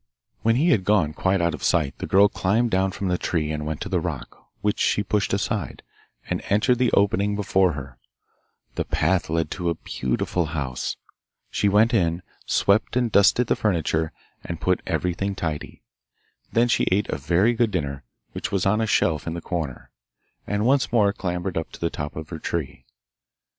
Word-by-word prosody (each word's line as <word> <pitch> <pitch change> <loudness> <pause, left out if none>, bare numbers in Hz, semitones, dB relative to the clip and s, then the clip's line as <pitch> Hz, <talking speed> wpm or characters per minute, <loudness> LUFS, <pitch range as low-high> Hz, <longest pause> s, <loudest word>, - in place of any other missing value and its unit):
When 115 +1 +3
he 155 +8 +3
had 105 - +3
gone 95 -7 +2
quite 95 +2 +1
out 85 0 +1
of - - -7
sight 75 -6 +1
the - - -4
girl 100 +2 +6
climbed 110 +4 0
down 95 +1 +2
from 95 - -4
the 90 - 0
tree 80 -3 -1
and 75 0 -3
went 75 -1 -4
to - - -3
the - - 0
rock, - - -6
which 105 0 0
she 105 - +2
pushed 105 +1 0
aside, 100 -2 -2 0.4
and - - -2
entered 115 +5 +3
the 125 -1 +3
opening 100 0 +2
before 95 -3 +2
her. 65 -3 -8 0.7
The - - -1
path 90 +2 +1
led 80 -1 -1
to 90 -3 -2
a 85 - 0
beautiful 75 +7 -2
house. 65 -3 -3 0.5
She 100 - +2
went 110 +4 +4
in, 85 -4 +1 0.2
swept 100 +4 +2
and 120 -2 +1
dusted 100 +5 +5
the - - +1
furniture, 80 -5 0 0.3
and - - -5
put - - +1
everything 95 +3 -1
tidy. 80 -5 -5 0.7
Then 120 +1 +3
she 120 - +1
ate 100 +3 +2
a - - -2
very 85 - +2
good 120 -1 +2
dinner, 70 -8 -3 0.3
which - - -5
was 95 -3 0
on 105 +3 +2
a 110 - 0
shelf 80 -7 +1
in 80 - -2
the - - -3
corner, 80 -7 -5 0.6
and 105 +1 0
once 135 +2 +2
more 105 -4 +3
clambered 90 -2 -2
up 80 - -7
to - - -10
the 85 - -1
top 75 +1 -5
of 80 0 -7
her 80 - -6
tree. 75 -6 -4
95 Hz, 190 wpm, -24 LUFS, 80-105 Hz, 0.7 s, girl